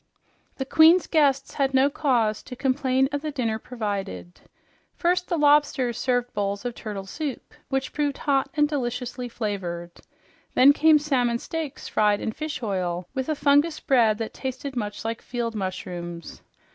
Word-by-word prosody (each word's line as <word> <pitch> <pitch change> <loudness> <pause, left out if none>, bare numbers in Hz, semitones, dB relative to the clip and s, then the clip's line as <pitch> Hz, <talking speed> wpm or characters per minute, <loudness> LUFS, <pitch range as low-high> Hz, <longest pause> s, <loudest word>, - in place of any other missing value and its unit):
The 265 - -3
queen's 325 +5 +6
guests 275 -4 +2
had 270 -1 0
no 265 +1 +5
cause 240 -7 +1
to 250 - -9
complain 265 0 +1
of 285 0 -2
the 310 - -3
dinner 235 -6 -2
provided. 205 -7 -5 0.5
First 360 +1 +1
the 345 - -1
lobsters 290 -5 +3
served 245 -1 0
bowls 200 +1 -2
of 245 - -2
turtle 205 -4 -6
soup, 285 +5 -6 0.2
which 270 -1 -2
proved 290 -2 -1
hot 275 -2 +1
and 295 -1 +4
deliciously 250 -3 -3
flavored. 185 -7 -4 0.6
Then 275 +3 +7
came 315 +1 +5
salmon 255 -6 +1
steaks 310 +2 -5
fried 210 -1 +2
in - - -2
fish 305 +1 -5
oil, 180 -4 -2
with 265 +1 -3
a 310 - +1
fungus 290 +3 +3
bread 230 -6 +3
that 225 -1 -4
tasted 265 +1 -5
much 210 -2 -4
like 225 0 -3
field 235 -2 -3
mushrooms. 180 -4 -6
255 Hz, 160 wpm, -25 LUFS, 215-285 Hz, 0.6 s, Then